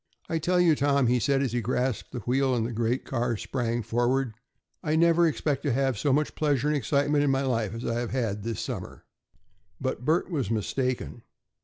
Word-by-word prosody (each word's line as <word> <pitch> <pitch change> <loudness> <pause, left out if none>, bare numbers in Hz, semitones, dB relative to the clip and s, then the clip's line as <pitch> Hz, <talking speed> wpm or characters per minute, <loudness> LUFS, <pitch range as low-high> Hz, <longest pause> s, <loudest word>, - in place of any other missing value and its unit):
"I 165 - -1
tell 180 +3 +1
you, 175 -2 +5
Tom," 140 -1 +2
he 125 +1 +3
said, 135 +2 +2
as 130 - -1
he 120 0 -1
grasped 125 +1 -1
the 125 - -5
wheel 130 +3 +1
and 115 -2 0
the 120 - -3
great 115 +3 -1
car 120 -3 -1
sprang 120 0 -2
forward, 120 +2 0 0.5
"I 155 0 0
never 170 +1 +4
expect 145 -2 -1
to 145 -4 0
have 135 0 +1
so 135 +7 0
much 150 +3 +1
pleasure 145 -3 +1
and 150 - +2
excitement 145 +3 +1
in 145 - +2
my 135 0 +1
life 115 -5 -1
as 115 - -6
I 115 0 -1
have 120 -1 -3
had 115 -6 -2
this 115 0 -4
summer." - - -6 0.7
But 120 - -3
Bert 165 +7 +1
was 140 - -1
mistaken. 120 +3 -2
130 Hz, 205 wpm, -27 LUFS, 120-145 Hz, 0.7 s, you